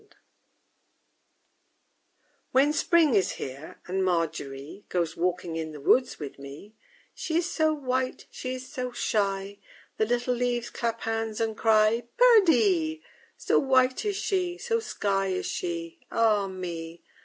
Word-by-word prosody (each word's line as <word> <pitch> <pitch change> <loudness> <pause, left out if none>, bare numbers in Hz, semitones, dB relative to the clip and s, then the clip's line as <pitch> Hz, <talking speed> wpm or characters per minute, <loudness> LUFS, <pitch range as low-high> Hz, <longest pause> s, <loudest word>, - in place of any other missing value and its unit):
_ - - -25
I 420 - -26 2.4
When 280 +3 +4
Spring 320 -2 +3
is 195 -3 +2
here 135 +4 -8
and 190 +1 -1
MARGERY 160 -1 -2
Goes 170 -3 -1
walking 175 -1 -1
in 160 -1 -4
the 150 - -8
woods 250 - +3
with 145 -2 -7
me, 140 +10 -11 0.4
She 320 - -2
is 345 0 +1
so 315 -1 +2
white, 260 -3 -2
she 255 0 -5
is 255 0 -8
so 255 -3 -4
shy, 200 -3 -1 0.4
The 220 - +1
little 245 +1 0
leaves 245 -1 -1
clap 230 -1 -2
hands 225 -1 -2
and 225 -1 -1
cry 220 +1 +3
_Perdie! 375 -8 +4 0.3
So - - +2
white 260 -2 +3
is 415 -2 -1
she, 365 -3 -1
so 460 +2 -1
sky 195 - -1
is 185 -1 -2
she, 170 -1 -4
Ah 215 -3 +2
me! 170 -3 -6
225 Hz, 145 wpm, -27 LUFS, 180-270 Hz, 2.4 s, When